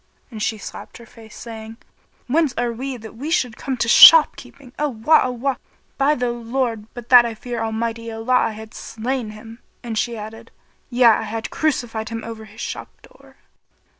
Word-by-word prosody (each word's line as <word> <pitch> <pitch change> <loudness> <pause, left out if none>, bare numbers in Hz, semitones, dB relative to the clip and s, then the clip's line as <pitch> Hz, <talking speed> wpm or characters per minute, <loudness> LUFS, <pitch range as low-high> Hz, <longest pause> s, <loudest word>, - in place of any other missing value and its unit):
And 220 -2 -8
she 220 +1 -1
slapt 205 - -10
her 235 - -14
face 220 -1 -15
saying, 225 -1 -9 0.5
"'Whence 295 +1 +1
are 240 -1 -1
we 260 +2 -5
that 220 -1 -12
we 280 +7 -6
should 250 -8 0
come 265 +2 -4
to 230 - 0
shopkeeping? 280 -2 +6
Awah! 295 +1 +3
Awah! 255 +2 -2 0.4
By 285 +2 +3
the 245 -2 -1
lord, 235 -2 -3
but 240 -1 -9
that 245 -1 +9
I 230 -1 -4
fear 240 0 -5
Almighty 230 +1 -3
Allah 225 +3 -2
I 250 - +3
had 220 +1 -11
slain 235 +1 -4
him;" 225 +2 -12 0.2
and 235 -2 -5
she 230 +2 -1
added, 220 +1 -9 0.4
"Yea, 250 0 +1
I 225 -2 +6
had 220 +1 -5
crucified[FN#32] 235 -8 -2
him 225 0 -5
over 225 -1 -8
his 215 +1 -12
shop - - -6
door!" - - -20
230 Hz, 180 wpm, -21 LUFS, 220-250 Hz, 0.5 s, that